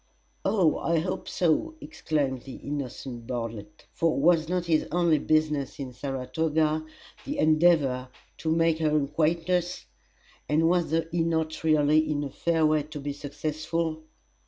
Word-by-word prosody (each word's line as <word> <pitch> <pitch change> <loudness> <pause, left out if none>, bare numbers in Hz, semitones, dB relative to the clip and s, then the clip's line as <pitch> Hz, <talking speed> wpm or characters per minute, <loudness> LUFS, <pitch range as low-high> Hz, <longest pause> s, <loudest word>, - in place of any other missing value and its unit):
"Oh, 180 -7 +2
I 165 0 +1
hope 180 +4 -3
so!" 185 - +1
exclaimed 145 - -2
the 130 +1 -9
innocent 130 -4 -6
Bartlett. 115 -4 -6
For 165 -3 +1
was 160 +1 +3
not 180 -1 0
his 160 -2 +1
only 170 -3 +3
business 150 -2 0
in 135 -3 -6
Saratoga 150 +4 -1 0.4
the 290 +1 -4
endeavour 155 - +3 0.3
to 160 - -2
make 165 0 +2
her 155 -1 +2
acquaintance? 170 - 0 0.6
And 155 +2 +3
was 175 -1 +1 0.2
he 170 0 0
not 160 -1 -1
already 155 0 +3
in 145 -1 -1
a 140 - -5
fair 165 +1 +1
way 155 0 +3
to 150 +1 -8
be 145 0 -4
successful? 155 +3 -3
155 Hz, 140 wpm, -27 LUFS, 145-165 Hz, 0.6 s, was